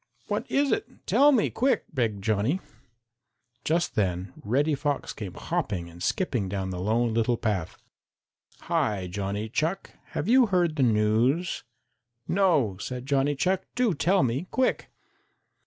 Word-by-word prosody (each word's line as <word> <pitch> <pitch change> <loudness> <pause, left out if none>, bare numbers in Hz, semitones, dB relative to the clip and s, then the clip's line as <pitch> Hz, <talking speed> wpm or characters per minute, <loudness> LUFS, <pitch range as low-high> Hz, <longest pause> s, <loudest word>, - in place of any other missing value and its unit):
"What - - -2
is 280 0 +2
it? 420 - -3
Tell 290 +1 +5
me 240 -7 +2
quick!" 265 +2 +1
begged 110 -7 -1
Johnny. 110 - +1 1.0
Just 170 +2 0
then 90 -3 -1
Reddy 140 +8 +1
Fox 145 0 -2
came 100 -5 -7
hopping 85 -4 -3
and 85 +1 -13
skipping 120 - -1
down 95 -1 -3
the 90 - -4
Lone 115 +3 +1
Little 115 +1 +1
Path. 105 -8 -2 0.8
"Hi, 100 -3 0
Johnny 100 +3 -3
Chuck, 160 - -2 0.2
have 155 - -2
you 250 +1 +5
heard 175 -5 +1
the 145 - 0
news?" 120 +8 +2 0.6
"No," 165 - +2
said 125 +4 -5
Johnny 140 +1 +1
Chuck, 185 +7 +1
"do 245 -5 +2
tell 175 +3 +2
me 130 +8 -1
quick!" 260 0 0
125 Hz, 140 wpm, -27 LUFS, -, 1.0 s, Tell